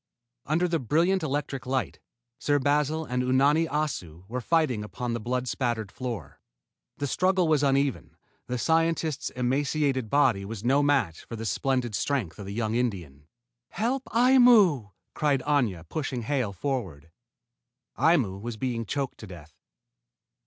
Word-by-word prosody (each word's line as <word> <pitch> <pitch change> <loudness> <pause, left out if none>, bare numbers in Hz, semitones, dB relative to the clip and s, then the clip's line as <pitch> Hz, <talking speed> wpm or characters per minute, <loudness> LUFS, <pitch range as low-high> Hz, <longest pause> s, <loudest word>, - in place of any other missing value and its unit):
Under 165 +5 +2
the 165 -1 0
brilliant 170 - +2
electric 140 -3 -3
light, 130 0 -2 0.4
Sir 145 -1 +2
Basil 150 +3 +1
and 125 -2 -1
Unani 140 +6 +3
Assu 115 - -3
were 125 +4 -4
fighting 140 -7 +1
upon 120 +3 -4
the 120 - -2
blood 125 +3 -2
spattered 120 -6 -2
floor. 115 - -6 0.6
The 145 - -2
struggle 185 +4 +2
was 155 -3 +3
uneven: 140 -1 0 0.3
the 125 - -2
scientist's 160 +1 0
emaciated 130 0 0
body 130 -8 +3
was 105 +1 -7
no 135 +4 +3
match 135 - +1
for 115 - -7
the 115 0 -6
splendid 125 0 -1
strength 105 - -2
of 100 - -7
the - - -5
young 110 -1 -1
Indian. 90 - -3 0.4
"Help 250 +7 -1
Aimu!" 230 - +5 0.2
cried 145 -3 +1
Aña, 120 - 0
pushing 130 - -3
Hale 125 -3 -1
forward. 95 - -4 0.8
Aimu 125 - +2
was 115 0 -5
being 115 -2 -3
choked 140 +1 -3
to 110 - -9
death. 80 -4 -12
130 Hz, 145 wpm, -27 LUFS, 110-150 Hz, 0.8 s, Aimu